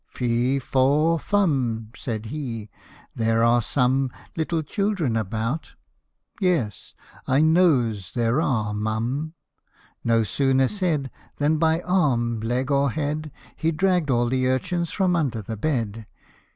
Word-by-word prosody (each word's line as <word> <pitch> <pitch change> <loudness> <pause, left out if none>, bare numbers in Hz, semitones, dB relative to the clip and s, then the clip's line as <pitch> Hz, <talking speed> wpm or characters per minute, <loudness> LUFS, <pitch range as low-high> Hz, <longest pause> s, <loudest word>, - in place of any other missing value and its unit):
" - - -50
Fee, 125 +2 0
faw, 145 +5 +2
fum 130 - 0
!" - - -20
Said 110 -3 -4
he, 115 -8 -5 0.2
" - - -25
there 115 0 +2
are 120 +1 +4
some 130 +2 +1 0.3
Little 160 0 -1
children 195 - -1
about 110 +7 -3 0.6
yes, 170 - -1 0.3
I 135 +3 +3
nose 125 - +2
there 120 +4 +2
are, 110 -8 0
mum! 115 +9 -2 0.3
" - - -34
No 115 -1 +3
sooner 135 +4 +2
said, 165 -10 -1 0.3
Than 150 +2 +2
by 160 +1 +2
arm, 125 -12 +1
leg, 125 +5 -1
or 140 0 +3
head, 150 +2 -3 0.2
He 160 - 0
dragged 180 -1 +1
all 120 -2 +2
the 130 +1 +1
urchins 170 +7 0
from 185 -3 +1
under 130 -10 -1
the 110 +3 -5
bed. 115 -4 -2
130 Hz, 140 wpm, -24 LUFS, 115-160 Hz, 0.6 s, are